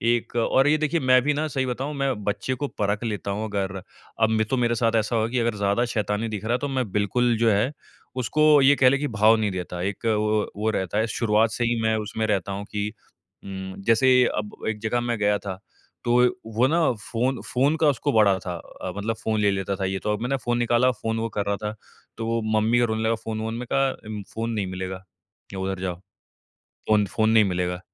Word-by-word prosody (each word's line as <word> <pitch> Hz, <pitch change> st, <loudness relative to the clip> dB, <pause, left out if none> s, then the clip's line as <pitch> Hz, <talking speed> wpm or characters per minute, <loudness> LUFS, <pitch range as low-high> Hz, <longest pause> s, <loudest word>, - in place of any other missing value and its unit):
एक 120 Hz, -, -6 dB
और 130 Hz, +4 st, +3 dB
ये 150 Hz, +1 st, +4 dB
देखिए 155 Hz, +2 st, 0 dB
मैं 130 Hz, -2 st, +4 dB
भी 150 Hz, +2 st, +2 dB
ना 155 Hz, +2 st, -1 dB
सही 135 Hz, -3 st, -1 dB
बताऊँ 130 Hz, +4 st, -3 dB
मैं 140 Hz, -1 st, 0 dB
बच्चे 105 Hz, +6 st, -1 dB
को -, -, 0 dB
परख 105 Hz, +2 st, 0 dB
लेता 105 Hz, -3 st, -3 dB
हूँ 105 Hz, +2 st, -2 dB
अगर 95 Hz, -1 st, -2 dB, 0.4 s
अब 110 Hz, 0 st, +3 dB
तो 130 Hz, -, +1 dB
मेरे 120 Hz, -1 st, +1 dB
साथ 115 Hz, 0 st, +1 dB
ऐसा 110 Hz, +1 st, +1 dB
होगा 110 Hz, -1 st, +1 dB
कि 125 Hz, +1 st, 0 dB
अगर 115 Hz, -2 st, 0 dB
ज़्यादा 100 Hz, +4 st, +1 dB
शैतानी 105 Hz, +1 st, -1 dB
दिख 105 Hz, -2 st, -5 dB
रहा 115 Hz, -, +1 dB
है 125 Hz, -, +1 dB
तो 145 Hz, -, -2 dB
मैं 130 Hz, -6 st, -2 dB
बिल्कुल 115 Hz, +4 st, +1 dB
जो 115 Hz, 0 st, +3 dB
है 105 Hz, +6 st, +2 dB, 0.5 s
उसको 150 Hz, +3 st, +4 dB
ये 140 Hz, +1 st, +6 dB
कह 130 Hz, -2 st, +5 dB
ले 140 Hz, -, +2 dB
कि 145 Hz, +1 st, -2 dB
भाव 110 Hz, -2 st, +4 dB
नहीं 105 Hz, -2 st, 0 dB
देता। 90 Hz, -1 st, -5 dB
एक 100 Hz, +4 st, -4 dB
वो 105 Hz, -1 st, +1 dB
वो 110 Hz, +1 st, 0 dB
रहता 95 Hz, -1 st, -2 dB
है 110 Hz, +1 st, +2 dB
शुरुआत 110 Hz, 0 st, +2 dB
से 120 Hz, -, -2 dB
ही 115 Hz, -1 st, 0 dB
मैं 110 Hz, 0 st, +2 dB
उसमें 110 Hz, +1 st, -3 dB
रहता 100 Hz, -2 st, 0 dB
हूँ 100 Hz, +1 st, -5 dB
कि 105 Hz, 0 st, -2 dB, 0.6 s
उम, 95 Hz, -1 st, -6 dB
जैसे 125 Hz, +2 st, +5 dB
अब 105 Hz, -1 st, -4 dB
एक 110 Hz, -1 st, -3 dB
जगह 110 Hz, +2 st, 0 dB
मैं 120 Hz, -1 st, -1 dB
गया 105 Hz, 0 st, +2 dB
था 95 Hz, -2 st, -6 dB, 0.5 s
तो 120 Hz, -, +2 dB, 0.4 s
वो 120 Hz, +3 st, +4 dB
ना 165 Hz, +4 st, +2 dB
फ़ोन 120 Hz, +4 st, -2 dB
फ़ोन 140 Hz, +5 st, +3 dB
का 155 Hz, -, +5 dB
उसको 145 Hz, +1 st, 0 dB
बड़ा 100 Hz, -3 st, +4 dB
था। 90 Hz, -1 st, -5 dB
अ, 90 Hz, -, -8 dB
मतलब 110 Hz, +2 st, -2 dB
फ़ोन 110 Hz, -1 st, 0 dB
ले 100 Hz, -1 st, +3 dB
लेता 95 Hz, 0 st, -2 dB
था 95 Hz, -, -2 dB
ये 95 Hz, 0 st, -2 dB
तो 105 Hz, -, 0 dB
अब 105 Hz, -, -4 dB
मैंने 130 Hz, +3 st, 0 dB
फ़ोन 120 Hz, 0 st, +1 dB
निकाला, 120 Hz, +1 st, +3 dB
फ़ोन 115 Hz, -1 st, -3 dB
वो 115 Hz, 0 st, -2 dB
कर 100 Hz, -, 0 dB
रहा 100 Hz, 0 st, 0 dB
था। 105 Hz, +2 st, -5 dB, 0.4 s
तो 115 Hz, -, -3 dB
वो 115 Hz, 0 st, 0 dB, 0.2 s
मम्मी 115 Hz, +3 st, +2 dB
को 120 Hz, -, +4 dB
रोने 110 Hz, -1 st, -2 dB
लगा 115 Hz, +1 st, +2 dB
फ़ोन-वोन 110 Hz, 0 st, -4 dB
मैंने 120 Hz, +1 st, -5 dB
कहा 120 Hz, -6 st, -1 dB
फ़ोन 115 Hz, +1 st, -3 dB
नहीं 105 Hz, -3 st, -1 dB
मिलेगा, 95 Hz, 0 st, -5 dB, 0.5 s
उधर 95 Hz, 0 st, -3 dB
जाओ। 90 Hz, -2 st, -2 dB, 0.9 s
फ़ोन 105 Hz, -1 st, +4 dB
फ़ोन 110 Hz, -1 st, +3 dB
नहीं 110 Hz, -1 st, +6 dB
मिलेगा। 90 Hz, -1 st, -1 dB
110 Hz, 230 wpm, -24 LUFS, 105-120 Hz, 0.9 s, ये